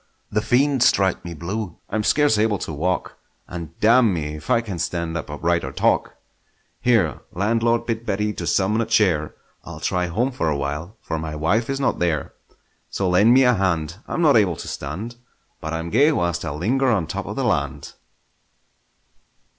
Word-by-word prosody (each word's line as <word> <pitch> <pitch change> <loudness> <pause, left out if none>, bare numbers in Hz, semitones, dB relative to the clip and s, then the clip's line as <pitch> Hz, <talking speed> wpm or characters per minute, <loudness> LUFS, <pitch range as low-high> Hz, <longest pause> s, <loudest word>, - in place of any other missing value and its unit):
The 105 - +1
fiend 135 +3 +2
strike 100 -8 +3
me 85 -1 -7
blue! 90 +3 -5
I'm 110 0 0
scarce 145 -3 +3
able 105 -1 +2
to 80 - -5
walk, 90 +5 -2 0.3
And 85 -2 -8
damn 115 0 +5
me 75 -4 -3
if 75 - -11
I - - +4
can 100 -7 -6
stand 85 -1 -2
upright 85 +2 -1
or 65 - -4
talk! - - +1 0.6
Here, 110 - +2
landlord, 115 +4 +1
bid 115 -1 -2
Betty 105 -1 -1
to - - -5
summon 105 +4 +2
a 115 - -2
chair; 80 -8 +2 0.3
I'll - - -9
try 90 0 0
home 115 +10 0
for 80 -11 -1
a 75 - 0
while, 75 +9 -4
for 80 - -3
my 80 -1 -5
wife 105 - 0
is 135 0 -1
not 135 - 0
there! 85 -4 -1 0.6
So 95 - -1
lend 100 +6 +5
me 135 - +6
a 125 -1 +5
hand; 85 -5 -1
I'm 170 - -1
not 145 -6 +6
able 95 -6 +3
to - - -8
stand, 100 +13 -6 0.4
But 80 - -5
I'm 80 +1 -4
gay 145 +7 +5
whilst 85 - -1
I 80 - -3
linger 120 - 0
on 100 -9 +1
top - - -5
of - - -5
the - - -1
land! - - -1
95 Hz, 185 wpm, -22 LUFS, 80-115 Hz, 0.6 s, me